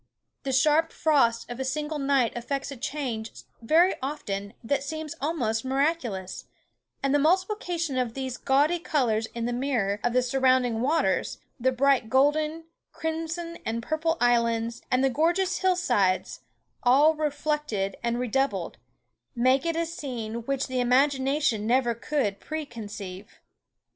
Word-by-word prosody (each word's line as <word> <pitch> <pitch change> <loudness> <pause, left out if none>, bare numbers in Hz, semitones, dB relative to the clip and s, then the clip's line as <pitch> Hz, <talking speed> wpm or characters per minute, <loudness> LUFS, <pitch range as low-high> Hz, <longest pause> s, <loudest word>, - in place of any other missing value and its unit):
The 270 - -3
sharp 305 +5 +3
frost 235 -7 +2
of 240 +1 -7
a - - -1
single 295 +3 -2
night 275 -4 +2
effects 275 +4 -3
a - - -6
change 250 -4 -4 0.2
very 330 +10 +4
often 205 -8 -4
that 275 +4 0
seems 310 +2 -5
almost 245 -8 -1
miraculous, 260 - -1 0.6
and 275 0 +2
the 290 - +4
multiplication 350 - 0
of 240 -2 -2
these 260 -2 -3
gawdy 290 +7 +2
colours 235 -9 0
in 235 -1 -2
the 240 - -1
mirror 240 -6 0
of 240 - +1
the 255 0 +3
surrounding 255 -2 +2
waters, 305 +6 +1 0.2
the 260 +2 +2
bright 260 -2 +2
golden, 300 +5 +2 0.3
crimson, 325 +1 -4
and 230 +1 -3
purple 320 +4 0
islands, 235 -1 +1
and 255 +1 +2
the 270 - +4
gorgeous 350 +6 +1
hill 375 -1 +3
sides, 200 - +1 0.4
all 280 +5 +5
reflected 295 -9 -2
and 235 0 -1
redoubled, 245 - -1 0.6
make 255 +5 +3
it 335 - 0
a 335 0 0
scene 235 -8 -5
which 275 -1 0
the 260 -1 -2
imagination 265 -2 +2
never 240 0 +3
could 235 -4 -2
pre 310 0 -5
conceive. 205 -5 -9
265 Hz, 145 wpm, -26 LUFS, 235-305 Hz, 0.6 s, all